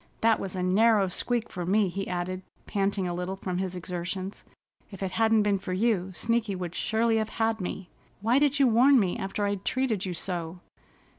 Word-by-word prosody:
"That 225 Hz, -1 st, +4 dB
was 190 Hz, -1 st, -4 dB
a 180 Hz, -, -2 dB
narrow 200 Hz, +1 st, +4 dB
squeak 235 Hz, +5 st, -1 dB
for 180 Hz, -, -4 dB
me," 200 Hz, +3 st, +2 dB
he 195 Hz, +2 st, -4 dB
added, 180 Hz, +1 st, -3 dB, 0.2 s
panting 195 Hz, -1 st, 0 dB
a 175 Hz, -, -2 dB
little 180 Hz, +2 st, -3 dB
from 185 Hz, -2 st, -3 dB
his 185 Hz, -1 st, -3 dB
exertions. 180 Hz, +2 st, -5 dB, 0.5 s
"If 195 Hz, -1 st, -7 dB
it 190 Hz, -, -2 dB
hadn't 225 Hz, -1 st, +3 dB
been 205 Hz, -2 st, +1 dB
for 185 Hz, -, -4 dB
you, 190 Hz, -2 st, +1 dB
Sneaky 230 Hz, -2 st, 0 dB
would 180 Hz, -2 st, -5 dB
surely 225 Hz, +3 st, +1 dB
have 220 Hz, 0 st, -1 dB
had 225 Hz, -1 st, +1 dB
me. 180 Hz, 0 st, -5 dB, 0.3 s
Why 230 Hz, +6 st, +3 dB
did 290 Hz, 0 st, +2 dB
you 280 Hz, -, +5 dB
warn 255 Hz, +3 st, +6 dB
me 185 Hz, -5 st, 0 dB
after 195 Hz, +2 st, -2 dB
I'd 200 Hz, -1 st, -2 dB
treated 255 Hz, -6 st, 0 dB
you 180 Hz, -, -3 dB
so?" 170 Hz, 0 st, -3 dB
195 Hz, 200 wpm, -27 LUFS, 185-225 Hz, 0.5 s, warn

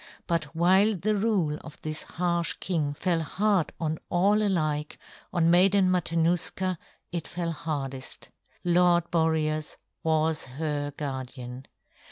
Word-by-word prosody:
But 165 Hz, -2 st, 0 dB
while 190 Hz, +5 st, +4 dB
the 210 Hz, +4 st, 0 dB
rule 195 Hz, -8 st, +1 dB
of 155 Hz, -, -11 dB
this 155 Hz, 0 st, -2 dB
harsh 170 Hz, -1 st, 0 dB
king 155 Hz, -6 st, -2 dB
fell 170 Hz, +1 st, 0 dB
hard 195 Hz, +2 st, +1 dB
on 160 Hz, -1 st, -2 dB
all 200 Hz, +4 st, +3 dB
alike, 155 Hz, -7 st, 0 dB, 0.3 s
on 170 Hz, -2 st, +3 dB
Maiden 185 Hz, +1 st, +5 dB
Matanuska 175 Hz, +1 st, +1 dB, 0.3 s
it 170 Hz, -2 st, -3 dB
fell 170 Hz, -1 st, -3 dB
hardest. 140 Hz, -4 st, -4 dB, 0.3 s
Lord 175 Hz, -1 st, +3 dB
Boreas 155 Hz, -2 st, 0 dB, 0.2 s
was 160 Hz, -1 st, +1 dB
her 145 Hz, +2 st, -3 dB
guardian. 130 Hz, -2 st, -6 dB
165 Hz, 120 wpm, -27 LUFS, 155-180 Hz, 0.3 s, Maiden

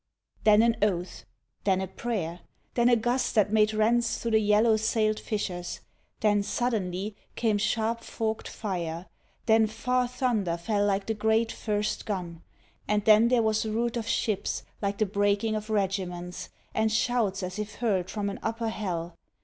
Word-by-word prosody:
Then 215 Hz, 0 st, +7 dB
an 235 Hz, -1 st, +3 dB
oath. 185 Hz, -3 st, -1 dB, 0.4 s
Then 190 Hz, -2 st, +2 dB
a 190 Hz, -, -1 dB
prayer! 190 Hz, -4 st, -3 dB, 0.3 s
Then 240 Hz, 0 st, +3 dB
a 240 Hz, -, +6 dB
gust 240 Hz, +3 st, 0 dB
that 210 Hz, -1 st, +3 dB
made 215 Hz, 0 st, +4 dB
rents 230 Hz, +2 st, +2 dB
Through 230 Hz, -, -3 dB
the 220 Hz, -, +5 dB
yellow 215 Hz, +2 st, +4 dB
sailed 215 Hz, -1 st, +1 dB
fishers. 180 Hz, -5 st, -4 dB, 0.4 s
Then 210 Hz, -1 st, +3 dB
suddenly 200 Hz, -3 st, -2 dB, 0.2 s
Came 220 Hz, -3 st, +1 dB
sharp 225 Hz, +2 st, 0 dB
forked 220 Hz, -1 st, -3 dB
fire! 175 Hz, -4 st, -4 dB, 0.4 s
Then 220 Hz, -1 st, +5 dB
far 250 Hz, +3 st, 0 dB
thunder 240 Hz, -9 st, 0 dB
fell 205 Hz, +3 st, 0 dB
Like 195 Hz, 0 st, 0 dB
the 220 Hz, -, -1 dB
great 220 Hz, +1 st, +1 dB
first 210 Hz, -1 st, -2 dB
gun! 175 Hz, -5 st, -4 dB, 0.5 s
Ah, 210 Hz, -, +3 dB
then 220 Hz, +1 st, +7 dB
there 240 Hz, -1 st, +3 dB
was 220 Hz, 0 st, +1 dB
route 230 Hz, +2 st, -1 dB
Of 230 Hz, -1 st, -3 dB
ships 215 Hz, -4 st, -1 dB, 0.2 s
like 200 Hz, -1 st, -1 dB
the 215 Hz, -, +2 dB
breaking 205 Hz, +2 st, +1 dB
of 215 Hz, 0 st, -4 dB
regiments 185 Hz, -4 st, -2 dB, 0.2 s
And 220 Hz, 0 st, +1 dB
shouts 220 Hz, -4 st, +1 dB
as 185 Hz, +3 st, -4 dB
if 210 Hz, 0 st, -5 dB
hurled 195 Hz, -6 st, 0 dB
from 205 Hz, -2 st, -2 dB
an -, -, -7 dB
upper 225 Hz, 0 st, -2 dB
hell. 175 Hz, -6 st, -4 dB
215 Hz, 165 wpm, -28 LUFS, 195-225 Hz, 0.5 s, Then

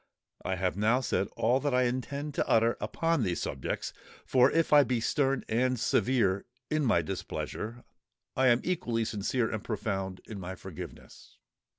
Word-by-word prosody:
I 95 Hz, -, -1 dB
have 90 Hz, 0 st, -1 dB
now 110 Hz, +5 st, +3 dB
said 115 Hz, -5 st, 0 dB
all 125 Hz, +4 st, +3 dB
that 145 Hz, -2 st, 0 dB
I 125 Hz, -, +4 dB
intend 140 Hz, +4 st, -2 dB
to -, -, -1 dB
utter 115 Hz, +1 st, +4 dB
upon 165 Hz, -3 st, 0 dB
these 90 Hz, -6 st, 0 dB
subjects; 65 Hz, -, -3 dB, 0.3 s
for 130 Hz, 0 st, +5 dB
if 165 Hz, -1 st, +1 dB
I 145 Hz, -1 st, +8 dB
be 125 Hz, -3 st, 0 dB
stern 135 Hz, +3 st, +1 dB
and 125 Hz, +2 st, +1 dB
severe 105 Hz, -7 st, +2 dB, 0.2 s
in 155 Hz, 0 st, +2 dB
my 110 Hz, -10 st, +3 dB
displeasure, 110 Hz, +8 st, -5 dB, 0.5 s
I 130 Hz, 0 st, +3 dB
am 120 Hz, 0 st, +4 dB
equally 120 Hz, -11 st, -1 dB
sincere 110 Hz, +3 st, -1 dB
and 110 Hz, -, -3 dB
profound 95 Hz, -3 st, -3 dB
in 105 Hz, -3 st, -7 dB
my 95 Hz, 0 st, -6 dB
forgiveness." -, -, -10 dB
120 Hz, 165 wpm, -30 LUFS, 100-130 Hz, 0.5 s, I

